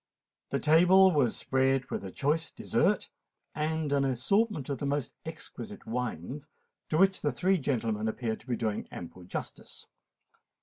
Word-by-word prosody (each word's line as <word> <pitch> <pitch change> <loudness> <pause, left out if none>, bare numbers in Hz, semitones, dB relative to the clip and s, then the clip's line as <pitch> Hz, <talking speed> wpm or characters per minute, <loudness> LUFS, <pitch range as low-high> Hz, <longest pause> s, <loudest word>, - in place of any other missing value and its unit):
The - - 0
table 180 +5 +6
was 140 -8 +2
spread 135 0 +1
with - - -3
a 95 - -5
choice 150 - 0
dessert - - 0 0.4
and 155 -1 -1
an 140 -1 +3
assortment 145 - +1
of 140 - -3
the 145 - -2
most 140 -2 -1
exquisite - - -8
wines, 125 - -4 0.4
to 155 - +1
which 190 +2 +4
the 145 - +1
three 185 +9 +2
gentlemen 115 -6 -1
appeared 110 0 -2
to 120 - -20
be 125 - 0
doing 110 -3 -2
ample 90 +1 -9
justice. - - -7
140 Hz, 150 wpm, -30 LUFS, 120-160 Hz, 0.4 s, table